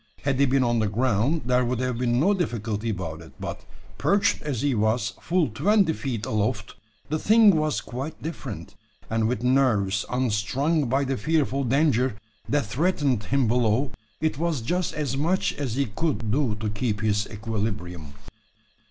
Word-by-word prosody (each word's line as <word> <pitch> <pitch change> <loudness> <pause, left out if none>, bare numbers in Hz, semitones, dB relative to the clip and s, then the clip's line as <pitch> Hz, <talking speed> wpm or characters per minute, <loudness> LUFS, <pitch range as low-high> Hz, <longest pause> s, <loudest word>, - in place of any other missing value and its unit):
Had 135 -2 0
he 140 - +5
been 130 0 +3
on 120 -1 +2
the 110 - +1
ground, 125 +7 +1
there 125 0 +3
would 125 +1 -1
have 125 -2 -1
been 120 -1 +1
no 190 +8 +4
difficulty 115 - -2
about 85 -6 -4
it; 80 - -13
but, - - -5 0.4
perched 200 0 +2
as 140 -5 -3
he 145 -2 +2
was 110 -1 +1
full 175 -2 +1
twenty 195 - +3
feet 120 -8 -4
aloft, 110 0 -1 0.4
the 155 +1 0
thing 215 -1 +6
was 155 -1 0
quite 135 +6 -6
different; 125 - -6 0.4
and, 110 -1 +1
with 120 0 -2
nerves 115 -7 +2
unstrung 130 +5 0
by 135 +3 +2
the 135 -1 -1
fearful 140 +1 +1
danger 130 -2 +2 0.3
that 145 -3 +1
threatened 135 - 0
him 135 -2 +1
below, 120 +3 +2 0.3
it 155 -2 -1
was 165 -6 0
just 175 +9 -1
as 145 -4 -2
much 170 +7 +1
as 130 -6 -3
he 140 +1 +1
could 115 -2 -2
do 130 -4 +1
to 105 0 -3
keep 105 0 -2
his 105 -1 +1
equilibrium. 100 -8 -4
125 Hz, 170 wpm, -25 LUFS, 110-145 Hz, 0.4 s, thing